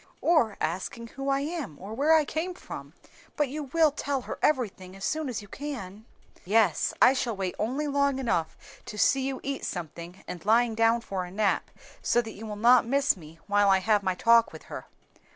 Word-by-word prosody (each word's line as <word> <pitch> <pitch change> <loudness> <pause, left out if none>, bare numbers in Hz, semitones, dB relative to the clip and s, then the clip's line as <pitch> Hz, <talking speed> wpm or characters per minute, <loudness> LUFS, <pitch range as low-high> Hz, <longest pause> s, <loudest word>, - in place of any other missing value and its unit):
"Or 260 -12 +3
asking 190 +7 -3
who 270 +3 -4
I 275 0 +2
am 290 - -4
or 200 +4 -8
where 295 +7 +4
I 310 -2 +4
came 345 +5 -3
from. - - -9 0.4
But 295 -3 +1
you 295 +2 -5
will 315 +2 +3
tell 280 -1 -2
her - - -7
everything 195 -10 0
as 195 - -6
soon 310 -3 -1
as 225 -4 -4
you - - -13
can?" 220 -6 -7 0.4
"Yes; 200 -3 +2
I 260 - +7
shall 245 -4 -1
wait 190 -2 -3
only 265 +8 -1
long 280 -1 +1
enough 230 -11 -1 0.3
to 210 - -7
see 270 +5 +3
you 270 -1 -3
eat 275 0 -3
something 170 +1 -6
and 175 - -7
lying 230 +2 +3
down 230 +1 +3
for 195 -5 -4
a 180 - -8
nap, 200 +1 0 0.3
so 240 - +2
that 225 -2 -3
you 220 +2 -9
will 210 - -5
not 235 +3 +5
miss 275 +4 +2
me 160 -3 -13
while 205 0 +3
I 190 - +6
have 210 +2 +2
my 190 -2 -1
talk 230 +4 +4
with - - -11
her." - - -7
230 Hz, 205 wpm, -27 LUFS, 195-275 Hz, 0.4 s, I